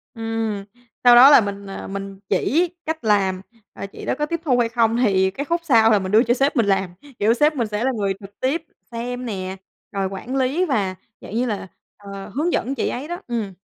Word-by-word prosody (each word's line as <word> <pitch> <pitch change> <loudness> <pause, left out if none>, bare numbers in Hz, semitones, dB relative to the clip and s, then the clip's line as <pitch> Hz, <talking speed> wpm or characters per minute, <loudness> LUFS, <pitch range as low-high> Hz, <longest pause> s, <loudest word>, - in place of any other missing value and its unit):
Ừm, 225 -3 -3 0.4
sau 245 -1 +8
đó 260 +3 +10
là 285 - +8
mình, 200 -1 -5
à, - - -7
mình 195 0 -6
chỉ 340 +5 +2 0.2
cách 320 -4 -3
làm, 195 -3 +2 0.3
à, - - -6
chị 200 - -10
đó - - 0
có 300 - +1
tiếp 335 +2 -3
thu 255 -6 +2
hay 230 -1 +2
không 230 0 +2
thì 190 -5 +2
cái 280 +8 -5
khúc 340 +3 -1
sau 225 -7 +5
là 210 - +4
mình 190 0 -4
đưa 220 +3 +6
cho 240 - +2
sếp 275 +3 +1
mình 230 -4 +3
làm. 195 -2 +1 0.3
Kiểu, 215 +3 +4
sếp 300 +4 +2
mình 235 -4 -1
sẽ 210 +2 -3
là 265 - +2
người 200 -2 0
trực 200 0 -14
tiếp 310 +6 -1 0.3
xem 245 +2 -4
nè, 190 -3 -4 0.3
rồi 195 -1 -1
quản 195 +7 -6
lý 270 +8 +1
và 200 - -1 0.3
dạng 215 - -8
như 245 +2 +1
là, 205 -4 -3 0.3
ờ, 200 -1 -9
hướng 330 +5 0
dẫn 270 +4 -1
chị 235 - -1
ấy 270 +5 -5
đó. 350 +3 -5
Ừm. 225 -5 -3
225 Hz, 235 wpm, -21 LUFS, 200-265 Hz, 0.4 s, đó